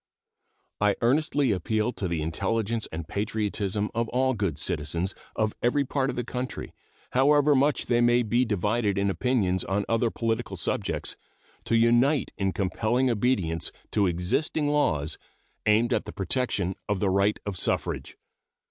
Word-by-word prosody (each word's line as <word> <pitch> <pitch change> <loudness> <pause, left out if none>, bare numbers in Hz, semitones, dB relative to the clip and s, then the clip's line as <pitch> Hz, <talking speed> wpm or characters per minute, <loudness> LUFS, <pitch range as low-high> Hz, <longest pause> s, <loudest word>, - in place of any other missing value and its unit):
I 105 -1 +3
earnestly 140 +1 +2
appeal 110 +5 0
to 100 - -3
the 85 -3 -2
intelligence 110 +7 -1
and 80 0 -5
patriotism 105 0 -2
of 115 0 -1
all 130 +1 +2
good 100 - -2
citizens 85 +5 -1 0.2
of 110 -1 0
every 140 +4 +2
part 135 0 0
of - - -3
the 120 - -2
country, 125 +2 -5 0.4
however 145 +3 +4
much 140 +2 +2
they 120 0 +2
maybe 120 0 +3
divided 105 -1 0
in 100 0 +2
opinions 95 -6 0
on 100 +1 -1
other 115 +1 +2
political 115 +1 -2
subjects, - - -2 0.5
to 115 - +1
unite 120 +5 +3
in 95 -1 0
compelling 110 +7 0
obedience 100 -8 0 0.2
to 100 -3 +2
existing 95 - 0
laws 80 - +1 0.5
aimed 110 +3 +4
at - - 0
the - - -6
protection 95 -2 0 0.2
of 100 -2 0
the 95 -1 +1
right 100 +2 +2
of 100 -2 -3
suffrage. - - -2
110 Hz, 150 wpm, -27 LUFS, 95-125 Hz, 0.5 s, however